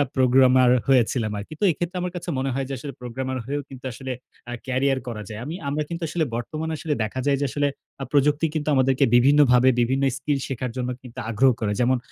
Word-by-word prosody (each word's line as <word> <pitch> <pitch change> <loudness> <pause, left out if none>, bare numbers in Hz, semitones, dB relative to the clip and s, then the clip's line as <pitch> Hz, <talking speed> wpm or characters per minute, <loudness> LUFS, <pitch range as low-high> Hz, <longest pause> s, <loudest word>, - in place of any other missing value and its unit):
Programmer 130 -1 +5 0.2
হয়েছিলাম 120 -4 +2
আরকি। 105 +10 -8
তো - - -3
এক্ষেত্রে 175 +3 -4
আমার 180 0 -2
কাছে 175 0 -5
মনে 135 +1 -1
হয় 135 0 -2
যে - - -3
আসলে 140 +3 -7
প্রোগ্রামের 130 +2 -4
হয়েও 145 +2 -2
কিন্তু 130 -1 -11
আসলে 130 +1 -6 0.4
আ - - -3
ক্যারিয়ার 130 +1 +1
করা 110 -3 -5
যায়। 110 0 -6
আমি, 160 +4 -5
আমরা 150 +2 -1
কিন্তু 170 0 -5
আসলে 165 0 0
বর্তমানে 155 +7 -4
আসলে 150 -1 -2
দেখা 110 +5 -4
যায় 140 -1 +3
যে - - +2
আসলে 145 -1 +1 0.3
আ - - -1
প্রযুক্তি 150 +2 +3
কিন্তু 155 0 -2
আমাদেরকে 130 0 +3
বিভিন্নভাবে 130 -1 +5
বিভিন্ন 130 +3 +1
স্কিল 145 -2 -1
শেখার 130 -2 -3
জন্য 125 0 -2
কিন্তু 125 -2 -10
আগ্রহ 130 +4 +4
করে। 105 -2 -1
যেমন 130 +1 +3
130 Hz, 210 wpm, -24 LUFS, 125-145 Hz, 0.4 s, Programmer